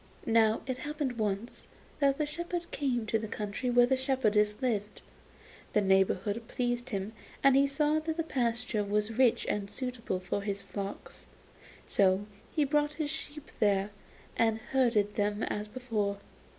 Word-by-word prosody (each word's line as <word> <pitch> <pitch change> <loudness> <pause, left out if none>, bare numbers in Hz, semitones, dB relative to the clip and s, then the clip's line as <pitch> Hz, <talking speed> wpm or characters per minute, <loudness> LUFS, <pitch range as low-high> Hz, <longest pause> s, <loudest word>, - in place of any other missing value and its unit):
Now 225 -1 +4
it 255 -1 -3
happened 290 -4 -3
once 210 +2 -2 0.3
that 275 -1 +3
the 300 - +1
shepherd 345 +3 -4
came 250 -5 0
to 220 +1 +1
the 220 - -4
country 210 +4 -3
where 245 0 +6
the 265 +2 +2
shepherdess 220 -6 +2
lived. 215 -5 -2 0.7
The 210 - +4
neighbourhood 195 +3 +2
pleased 245 0 -1
him, 200 -1 -3 0.3
and 275 -1 +6
he 275 +1 +5
saw 300 +2 +2
that 315 +1 -3
the 330 - +1
pasture 240 -6 0
was 210 +3 -1
rich 250 -3 +4
and 200 -1 -2
suitable 235 -4 -3
for 190 +2 -2
his 200 -1 -3
flocks. 200 0 -7 0.6
So 195 0 +3 0.3
he 305 - +2
brought 295 +1 +1
his 295 -1 -2
sheep 300 -1 -5
there, 200 -2 +2 0.4
and 225 -1 +3
herded 230 -6 +3
them 205 0 0
as 210 0 -2
before. 210 -4 -2
230 Hz, 155 wpm, -31 LUFS, 210-270 Hz, 0.7 s, where